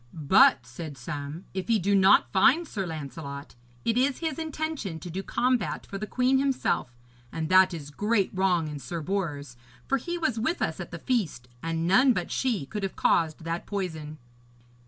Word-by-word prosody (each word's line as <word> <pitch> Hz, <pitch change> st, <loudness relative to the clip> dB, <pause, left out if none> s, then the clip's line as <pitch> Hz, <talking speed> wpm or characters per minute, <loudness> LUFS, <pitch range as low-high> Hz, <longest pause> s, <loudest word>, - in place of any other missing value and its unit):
'But,' 140 Hz, -4 st, +5 dB
said 140 Hz, +4 st, -8 dB
some, 145 Hz, +6 st, -6 dB
'if 190 Hz, -1 st, -4 dB
he 230 Hz, -1 st, +4 dB
do 200 Hz, +1 st, +1 dB
not 190 Hz, -1 st, +5 dB
find 290 Hz, -, +4 dB
Sir 195 Hz, -8 st, -3 dB
Lancelot, 140 Hz, -2 st, -7 dB, 0.3 s
it 230 Hz, +1 st, +2 dB
is 270 Hz, +1 st, +2 dB
his 325 Hz, -1 st, -3 dB
intention 310 Hz, -, -4 dB
to 175 Hz, +2 st, -8 dB
do 190 Hz, +3 st, -3 dB
combat 245 Hz, +1 st, 0 dB
for 195 Hz, -, -6 dB
the 215 Hz, -, -4 dB
queen 255 Hz, +3 st, +2 dB
himself, 265 Hz, -, 0 dB, 0.3 s
and 160 Hz, -1 st, -3 dB
that 185 Hz, 0 st, +6 dB
is 150 Hz, -4 st, -7 dB
great 205 Hz, +4 st, +1 dB
wrong 185 Hz, -4 st, +1 dB
in 150 Hz, -1 st, -6 dB
Sir 165 Hz, +6 st, -5 dB
Bors, 150 Hz, -8 st, -3 dB, 0.3 s
for 275 Hz, -, +1 dB
he 345 Hz, +7 st, -4 dB
was 260 Hz, -9 st, -1 dB
with 320 Hz, +10 st, 0 dB
us -, -, -2 dB
at -, -, -6 dB
the -, -, -6 dB
feast, 200 Hz, -, -1 dB
and 165 Hz, 0 st, -2 dB
none 250 Hz, +9 st, +5 dB
but 180 Hz, -5 st, -3 dB
she 235 Hz, -, 0 dB
could 210 Hz, +9 st, -5 dB
have 195 Hz, -1 st, -3 dB
caused 160 Hz, -1 st, +1 dB
that 165 Hz, +1 st, -4 dB
poison.' 160 Hz, -7 st, -4 dB
185 Hz, 185 wpm, -27 LUFS, 155-235 Hz, 0.3 s, that